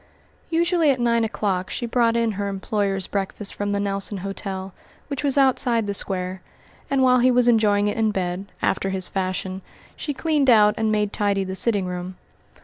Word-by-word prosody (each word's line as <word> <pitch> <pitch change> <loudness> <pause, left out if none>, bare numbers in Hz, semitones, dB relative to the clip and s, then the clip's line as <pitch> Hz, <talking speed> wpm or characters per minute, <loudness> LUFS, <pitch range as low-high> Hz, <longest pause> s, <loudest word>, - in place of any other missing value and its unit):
Usually 335 -1 +2
at 265 -2 +2
nine 235 -1 +2
o'clock 195 -4 -2
she 240 - -3
brought 235 -1 +2
in 230 -1 +1
her 200 0 -3
employer's 195 -1 -1
breakfast 200 0 -4
from 205 0 -3
the 200 0 0
Nelson 200 0 -2
Hotel, 195 -1 -5 0.4
which 280 0 -3
was 280 -1 +1
outside 250 -4 +3
the 200 - -2
Square, 185 -1 -2 0.5
and 275 -1 +2
while 255 -1 +5
he 250 +1 +4
was 245 -1 +3
enjoying 210 -3 +3
it 205 - -2
in 220 -1 +2
bed, 185 -1 -3 0.2
after 195 0 0
his 190 -1 -2
fashion, 185 0 -3 0.3
she 295 - -4
cleaned 295 -3 +1
out 210 -3 +6
and 220 0 0
made 210 -1 0
tidy 200 -1 0
the 190 0 -5
sitting 205 -2 +2
room. 180 0 -5
205 Hz, 185 wpm, -23 LUFS, 195-240 Hz, 0.5 s, out